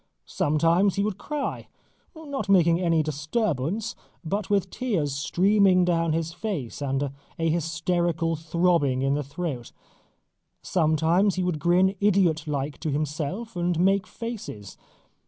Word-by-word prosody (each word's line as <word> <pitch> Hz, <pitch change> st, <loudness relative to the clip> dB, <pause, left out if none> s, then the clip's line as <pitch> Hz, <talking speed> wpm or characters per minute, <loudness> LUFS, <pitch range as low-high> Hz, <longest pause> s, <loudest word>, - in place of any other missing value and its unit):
Sometimes 165 Hz, +6 st, +2 dB
he 200 Hz, -, +1 dB
would 205 Hz, -2 st, -2 dB
cry 295 Hz, -1 st, -4 dB, 0.5 s
not 285 Hz, -8 st, -5 dB
making 170 Hz, -2 st, +4 dB
any 165 Hz, -3 st, +2 dB
disturbance 155 Hz, -, -2 dB, 0.3 s
but 200 Hz, +4 st, -2 dB
with 195 Hz, -2 st, +1 dB
tears 180 Hz, -, -1 dB
streaming 185 Hz, +5 st, +3 dB
down 165 Hz, -2 st, +1 dB
his 165 Hz, +1 st, -2 dB
face 170 Hz, -, -4 dB
and 135 Hz, 0 st, -1 dB, 0.3 s
a 165 Hz, 0 st, +1 dB
hysterical 165 Hz, 0 st, 0 dB
throbbing 160 Hz, -5 st, +1 dB
in 135 Hz, 0 st, +2 dB
the 145 Hz, -, 0 dB
throat. 140 Hz, -4 st, -5 dB, 0.9 s
Sometimes 165 Hz, +4 st, +2 dB
he 185 Hz, -, -1 dB
would 175 Hz, -4 st, -1 dB
grin 180 Hz, +4 st, +3 dB
idiot 180 Hz, -6 st, +2 dB
like 145 Hz, 0 st, -3 dB
to 160 Hz, -, -3 dB
himself 150 Hz, -, -3 dB
and 175 Hz, -1 st, 0 dB
make 195 Hz, +3 st, +2 dB
faces. 215 Hz, -, -7 dB
170 Hz, 130 wpm, -25 LUFS, 155-195 Hz, 0.9 s, making